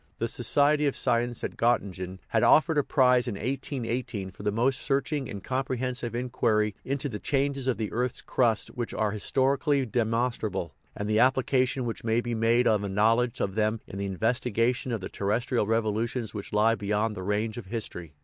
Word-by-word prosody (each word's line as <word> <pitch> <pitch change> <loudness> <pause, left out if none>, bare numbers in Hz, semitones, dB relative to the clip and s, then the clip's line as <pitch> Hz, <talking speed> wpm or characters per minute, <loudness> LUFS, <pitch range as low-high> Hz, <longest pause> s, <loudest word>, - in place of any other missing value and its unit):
The 115 - -1
Society 145 +6 +3
of 140 - -1
Science 120 -1 0
at - - -3
Gottingen 95 -6 0
had - - +2
offered 155 -1 +5
a - - +2
prize 125 -3 +3
in 115 - -2
1818 120 -3 -3
for - - -13
"the 105 0 0
most 125 +5 +1
searching 140 -1 -1
and 100 -2 -7
comprehensive 130 -2 -2
in 125 +1 -3
quiry 105 -4 +1
into 140 +1 -1
the 105 -6 -5
changes 140 0 0
in 125 -5 +1
the 110 -1 -3
earth's 125 +1 -2
crust 115 -4 +1
which 120 -2 -5
are 110 -1 0
historically 135 +6 +1
demonstrable, 115 -6 -1 0.2
and 105 - -3
the 110 0 +2
application 130 0 +2
which 115 - -4
may 115 0 +2
be 120 0 -3
made 115 +2 +3
of 105 -3 +3
a 100 - -3
knowledge 115 +4 +2
of 95 - -1
them 110 +1 0
in 95 - -8
the 100 0 -2
investi 115 +6 0
gation 120 +4 0
of 115 -4 -2
the - - -4
terrestrial 115 +2 -1
revolutions 115 +1 -1
which 105 -2 -6
lie 105 +2 +4
beyond 105 +1 -1
the 95 - -6
range 105 +4 -1
of 105 - -10
history." 90 -8 -5
115 Hz, 190 wpm, -27 LUFS, 105-130 Hz, 0.2 s, offered